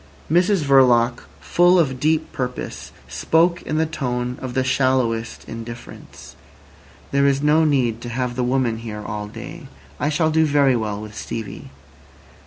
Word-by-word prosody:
Mrs 180 +1 +3
Verloc, 125 -3 +4
full 175 +1 +4
of 135 -7 +1
deep 155 +2 +1
purpose, 125 -1 -5 0.2
spoke 170 +2 +1
in 155 - -3
the 160 - +2
tone 125 -5 -3
of 130 -2 -5
the 130 - +2
shallowest 130 -3 0
indifference. 115 +1 -10 0.8
"There 140 0 +3
is 140 0 +1
no 155 +2 +4
need 125 -6 +1
to 120 - -6
have 125 0 -2
the 125 - -1
woman 125 -2 +1
here 105 -2 -7
all 105 0 -4
day. 105 - -9 0.3
I 145 - 0
shall 155 +1 +1
do 160 +1 +3
very 140 -3 +3
well 105 -3 -2
with 105 0 -9
Stevie." 110 -1 -6
130 Hz, 155 wpm, -21 LUFS, 115-150 Hz, 0.8 s, Verloc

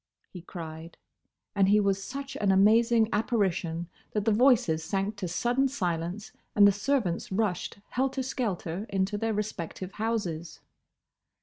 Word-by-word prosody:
he 180 - -9
cried; 165 -1 -8 0.6
and 195 -1 +3
he 210 +1 +5
was 195 -1 +1
such 275 +3 -6
an 200 -2 +2
amazing 220 +4 +5
apparition 185 -6 0 0.3
that 210 -1 -1
the 225 - +3
voices 220 -9 +4
sank 195 +5 -1
to 200 -3 -4
sudden 245 +10 +1
silence 180 -5 -3 0.2
and 205 -1 +8
the - - +6
servants 205 -5 -1
rushed, 195 -3 -1
helter 265 +1 -1
skelter, 205 -6 -3
into 195 +1 0
their 225 +2 -1
respective 190 -3 -4
houses. 190 -8 -3
200 Hz, 135 wpm, -28 LUFS, 180-225 Hz, 0.6 s, and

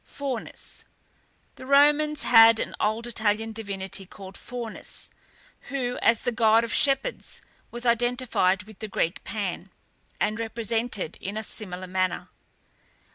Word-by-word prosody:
FAUNUS. 270 -5 -7 0.7
The 260 - -10
Romans 295 +2 +4
had 225 -1 +7
an - - -3
old 220 +2 0
Italian 225 -1 0
divinity 195 -3 -5
called 190 0 -11
Faunus, 240 -3 -8 0.6
who, 250 -3 -2
as 230 -1 +4
the 245 - -1
god 225 -1 +4
of 230 - -3
shepherds, 280 - 0 0.3
was 240 +1 -7
identified 235 -5 +1
with 215 0 -15
the 220 - -5
Greek 180 -3 -2
Pan, 195 -3 -4 0.5
and 215 +2 0
represented 230 -4 -2
in 200 +2 -5
a 220 - -3
similar 185 -4 -4
manner. 185 0 -1
225 Hz, 130 wpm, -26 LUFS, 200-245 Hz, 0.7 s, had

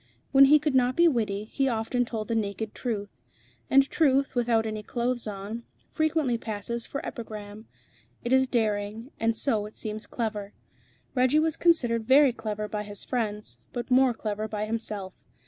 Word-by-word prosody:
When 275 0 +8
he 295 +2 +7
could 300 -1 -1
not 250 -1 +3
be 340 0 +6
witty, 215 -8 0
he 270 +5 -1
often 240 +1 0
told 220 -2 -4
the 230 - -1
naked 215 0 -2
truth; 205 - -4 0.5
and 275 0 +5
truth, 275 -3 +2
without 235 -2 +2
any 215 -1 -3
clothes 240 +2 -2
on, 210 +3 -5 0.3
frequently 310 -6 +1
passes 230 +2 -4
for 280 - -5
epigram. 215 -2 -7 0.6
It 240 - 0
is 265 0 +4
daring, 220 +1 -1
and 225 0 +1
so 215 -6 +1
it 210 - -15
seems 215 0 -5
clever. 210 -3 -4 0.6
Reggie 255 +3 +3
was 315 0 +2
considered 240 -10 +2
very 270 -1 +6
clever 215 -2 -4
by 210 0 -3
his 205 -1 -5
friends, 210 - -3
but 240 +1 -5
more 255 -1 +5
clever 215 -1 -3
by 210 -1 -3
himself. 215 -4 -3
230 Hz, 165 wpm, -27 LUFS, 210-255 Hz, 0.6 s, When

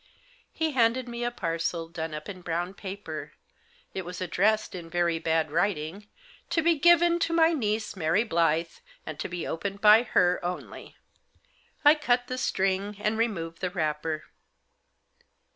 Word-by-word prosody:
He 320 -1 -1
handed 250 -1 +2
me 240 0 -5
a 240 - +1
parcel 165 -5 -2
done 160 -2 -5
up 150 - -7
in 185 -3 -8
brown 175 +2 -2
paper. 200 0 -7 0.6
It 190 - -3
was 180 +1 -7
addressed, 205 +4 +1
in 170 -3 -7
very 170 -1 +1
bad 160 -1 0
writing, 175 +2 -1 0.2
" - - -26
To 330 - +1
be 340 +1 +5
given 345 +1 +5
to 335 - 0
my 330 0 +4
niece, 220 -7 -1
Mary 175 +4 +2
Blyth, 165 -3 0 0.2
and - - -7
to - - -3
be 175 -1 -4
opened 195 +4 -4
by 215 +2 +7
her 180 -7 +2
only." 180 +1 -6 0.9
I 295 - +9
cut 250 -5 +1
the 255 +1 -4
string, 195 -1 0
and 210 +1 0
removed 170 -8 -2
the 185 - 0
wrapper. 155 -2 -2
190 Hz, 160 wpm, -27 LUFS, 165-235 Hz, 0.9 s, I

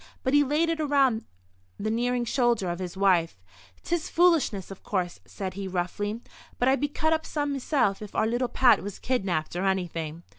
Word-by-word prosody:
But 260 - 0
he 290 0 +6
laid 300 +4 +1
it 330 -1 -1
around 275 -6 +2 0.5
the 215 +1 -2
nearing 245 +1 0
shoulder 235 -7 +1
of 175 - -5
his 185 0 -5
wife. 175 - +2 0.4
"'Tis 340 -2 -2
foolishness, 320 - +2
of 195 - -10
course," 180 -3 -2
said 190 -2 -5
he, 195 0 -5
roughly, 200 +5 -3 0.4
"but 245 - +1
I'd 270 +1 +3
be 290 - +2
cut 315 +2 0
up 320 0 0
some 290 -2 -2
meself 265 -7 0
if 210 - -9
our - - +2
little 240 +2 0
Pat 250 +1 +4
was 200 0 -6
kidnapped 190 -11 -1
or 180 - -1
anything. 170 -4 -2
225 Hz, 190 wpm, -27 LUFS, 190-275 Hz, 0.5 s, he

